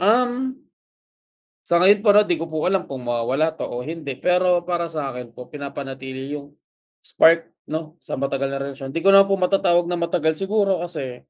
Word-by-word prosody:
Um 250 +6 +1 1.0
sa 170 +1 +4
ngayon 200 +2 +6
para 205 +1 +7
di 175 -5 -1
ko 165 - -4
po 155 -1 -4
alam 190 +1 +1
kung 130 -2 -7
mawawala 125 +6 0
pa - - -3
o 120 +1 -5
hindi. 150 -2 -6
Pero 180 +3 +2
para 175 -1 -2
sa'kin 135 -7 -6
po 125 - -11
pinapanatili 135 -2 -7
yung, 145 0 -7 0.5
spark 165 +1 +4 0.2
'no, 160 +1 -6
sa - - -7
matagal 135 0 -2
na 135 - -3
relasyon. 135 0 -7
Di 165 - -2
ko 195 - +5
naman 195 0 +7
po 195 - +1
matatawag 180 -2 +2
na - - 0
matagal 160 -2 0
siguro 195 -2 +1
kasi 135 -8 -6
165 Hz, 180 wpm, -22 LUFS, 135-185 Hz, 1.0 s, para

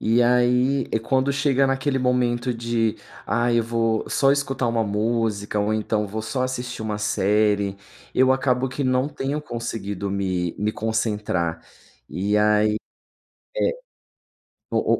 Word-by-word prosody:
Eh, 115 +2 +3
aí 125 +2 +3
quando 130 +4 +1
chega 135 -1 +2
naquele 135 +1 0
momento 125 -1 +1
de: 115 -1 -1 0.3
"Ai 120 0 +2
eu - - +3
vou 115 -1 0
só 135 0 +4
escutar 135 -2 -1
uma 115 -1 +1
música 105 0 -1
ou 105 +1 0
então 105 -1 0
vou 110 +3 -4
só 120 +4 -2
assistir 125 -2 -3
uma 105 -1 -3
série", 105 -1 +1 0.4
eu 130 +1 +5
acabo 130 -1 +1
que 135 +3 -4
não 130 +1 +1
tenho 145 +1 -3
conseguido 110 -7 -4
me 95 -3 -1
me 105 +1 0
concentrar. 105 -7 -1 0.5
E 100 +3 0
aí 105 0 +3 0.8
é - - +2 1.0
o - - +2
115 Hz, 135 wpm, -23 LUFS, 105-130 Hz, 1.0 s, eu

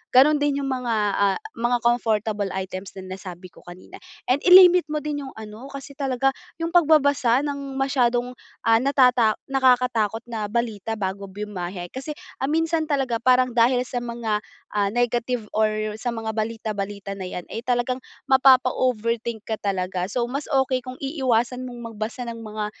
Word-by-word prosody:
gano'n 280 +4 +7
din 285 -1 0
'yung - - -2
mga, 250 -3 -1 0.2
ah, 200 -1 +2 0.2
mga 240 +1 +1
comfortable 220 -3 +1
items 190 0 -5
na 185 -1 -7
nasabi 185 -1 -9
ko - - -17
kanina. 175 +1 -11 0.3
And 255 +3 +3
i-limit 360 -2 +8
mo 300 - 0
din 290 -1 -3
yung - - -9
ano, 220 +3 -9
kasi 275 0 -8
talaga 270 -1 +1 0.3
'yung 330 0 -2
pagbabasa 285 -6 +4
ng 280 -2 -4
masyadong 250 -2 +1 0.4
ah, 225 0 +6
natata 250 -5 +4
nakakatakot 250 -5 +2
na 220 -3 -3
balita 225 -2 -2
bago 195 +1 -3
bumiyahe. 185 -3 -6
Kasi 270 +4 -6 0.4
minsan 325 0 +1
talaga, 270 -5 0
parang 255 +1 +3
dahil 245 +1 +4
sa 245 - -3
mga 230 -3 -2 0.3
ah, 200 -1 +1
negative 240 -1 -1
or 215 0 +1
sa 245 - -1
mga 225 -1 -3
balita 220 0 -3
balita 200 0 -5
na 190 -2 -6
'yan 180 -1 -6
eh, 225 - -4
talagang 250 +1 0 0.3
mapapa-overthink 250 -4 +2
ka 220 -1 -3
talaga. 185 -2 -2
So, 240 +3 -1
mas 280 +2 -3
okey 265 -2 +2
kung 255 +1 -8
iiwasan 255 -4 0
mong 240 -2 -8
magbasa 220 +3 -4
ng 235 -1 -6
mga 215 -1 -4
240 Hz, 160 wpm, -23 LUFS, 215-265 Hz, 0.4 s, i-limit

